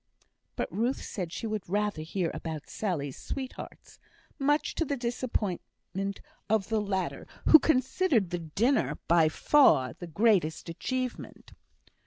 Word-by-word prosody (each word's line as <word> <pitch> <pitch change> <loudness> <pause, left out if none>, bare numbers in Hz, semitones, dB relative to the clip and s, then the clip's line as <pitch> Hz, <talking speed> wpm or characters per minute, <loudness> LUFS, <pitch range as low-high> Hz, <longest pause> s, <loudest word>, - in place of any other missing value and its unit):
But - - -3
Ruth 240 +6 0
said 180 -6 -5
she 225 - -5
would 215 -5 -3
rather 205 -3 0
hear 165 +2 -2
about 160 -3 -5
Sally's 150 -10 -3
sweethearts, 260 -2 -7 0.4
much 290 +2 +1
to - - 0
the 285 -2 -2
disappointment 205 -5 -3 0.3
of 215 -2 +1
the 220 -1 +1
latter, 195 -2 -2 0.2
who 315 - +11
considered 260 - +2
the 175 - -1
dinner 220 - +1
by 165 -2 +5
far 155 - +4
the 175 - -9
greatest 175 -3 +2
achievement. 255 +8 -4
210 Hz, 130 wpm, -29 LUFS, 170-255 Hz, 0.4 s, who